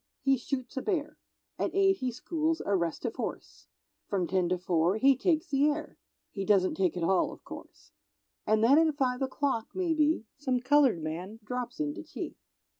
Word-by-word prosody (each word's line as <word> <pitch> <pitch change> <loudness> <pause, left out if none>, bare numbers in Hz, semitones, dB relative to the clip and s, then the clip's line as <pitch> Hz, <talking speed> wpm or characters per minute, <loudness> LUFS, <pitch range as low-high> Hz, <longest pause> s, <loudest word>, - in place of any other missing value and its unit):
he 270 0 +3
shoots 255 0 -5
a 265 - -2
bear, 305 -5 -2 0.4
At - - -1
8 390 -1 +4
he 255 -5 -2
schools 320 +6 -1
a 200 - +2
restive 170 -3 -2
horse, - - -6 0.4
From 190 -3 0
10 180 -1 0
to 185 - +1
4 175 +1 +1
he 270 +4 +5
takes 315 +4 +1
the 280 +1 +3
air, 300 +1 -4 0.3
(He 195 - -4
doesn't 190 -1 +3
take 185 -2 0
it 175 - -2
all, 185 +2 +2
of - - -13
course); - - -12 0.6
And 215 0 +3
then 275 +6 +6
at 315 -3 +2
5 255 -2 0
o'clock, 265 -3 -1
maybe, 320 -7 +1
Some 260 -4 0
colored 255 - +3
man 180 +8 -5
drops 250 +2 -5
in 145 -1 -1
to - - -7
tea. - - -7
250 Hz, 185 wpm, -29 LUFS, 190-295 Hz, 0.6 s, then